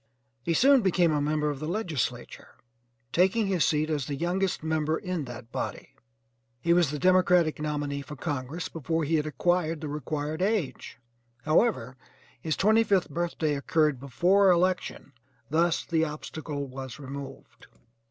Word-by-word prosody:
He 165 +6 -1
soon 270 - +6
became 180 -4 +3
a 150 -1 +1
member 150 0 0
of 140 - -6
the 155 - -4
legislature, 170 - -3 0.6
taking 190 +5 +3
his 190 -4 +1
seat 155 0 +1
as 145 -4 -1
the 145 - -3
youngest 180 +4 -1
member 160 0 0
in 180 -6 -3
that 120 -1 -10
body. - - -5 0.7
He 170 +6 +2
was 175 -4 +3
the 150 - -3
Democratic 180 -2 +3
nominee 145 -2 -2
for 145 +2 -9
Congress 145 +2 -4
before 165 +1 -2
he 160 +2 +1
had 150 0 -1
acquired 165 +2 0
the 155 - -5
required 150 +2 -3
age, 195 -7 -1 0.5
however, 155 - +1 0.4
his 160 -2 -2
twenty 220 +3 +4
fifth 195 -7 +1
birthday 165 -1 -1
occurred 150 -1 +1
before 180 +9 +3
election, 180 -4 0 0.4
thus 165 +1 +2
this 160 -1 +1
obstacle 150 -1 -5
was 130 -1 -8
removed. 140 -1 -9
155 Hz, 150 wpm, -27 LUFS, 145-180 Hz, 0.7 s, soon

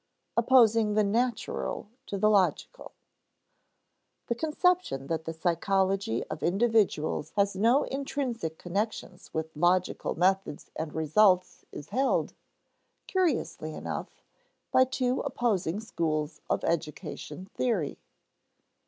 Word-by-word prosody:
[Sidenote: 235 - +2
Opposing 230 -4 +5
the 215 - +4
natural 230 +2 -1 0.2
to 200 - -3
the 215 +2 +3
logical] 195 -3 0 1.3
The 235 - 0
conception 315 - +1
that 160 +2 -3
the 165 - -3
psychology 185 - 0
of - - -7
individuals 195 -6 +1
has 200 -1 +2
no 230 +8 +4
intrinsic 260 - -3
connections 195 0 -4
with 160 0 -4
logical 175 +3 +1
methods 190 -2 0
and 160 -1 -4
results 180 +4 +3
is 145 - -9
held, 265 +2 +1 0.7
curiously 310 - -1
enough, - - -6 0.5
by 260 - +6
two 255 0 0
opposing 210 -9 0
schools 155 -8 -2
of - - 0
educational 170 +3 -3
theory. 205 - -1
195 Hz, 110 wpm, -28 LUFS, 165-235 Hz, 1.3 s, by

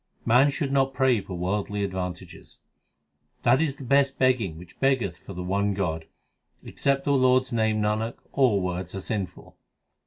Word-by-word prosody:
Man 125 +5 +5
should 140 -1 -2
not 135 -1 +1
pray 130 -5 +3
for 95 -1 -7
worldly 100 +3 -2
advantages: 90 -2 -6 0.9
That 130 - +4
is 145 -4 0
the 140 - -10
best 140 +1 +2
begging 120 -11 +1
which 85 +1 -14
beggeth 125 -10 +1
for 100 - -10
the 90 - -5
one 100 +2 0
God; 80 -5 -2 0.6
Except 140 0 -1
the 145 - +2
Lord 130 -1 +4
s 130 - -10
name, 110 -2 +1
Nanak, 105 +2 -1 0.2
all 120 -8 +3
words 90 0 -4
are - - -3
sinful. 95 -3 -5
110 Hz, 165 wpm, -26 LUFS, 95-135 Hz, 0.9 s, Man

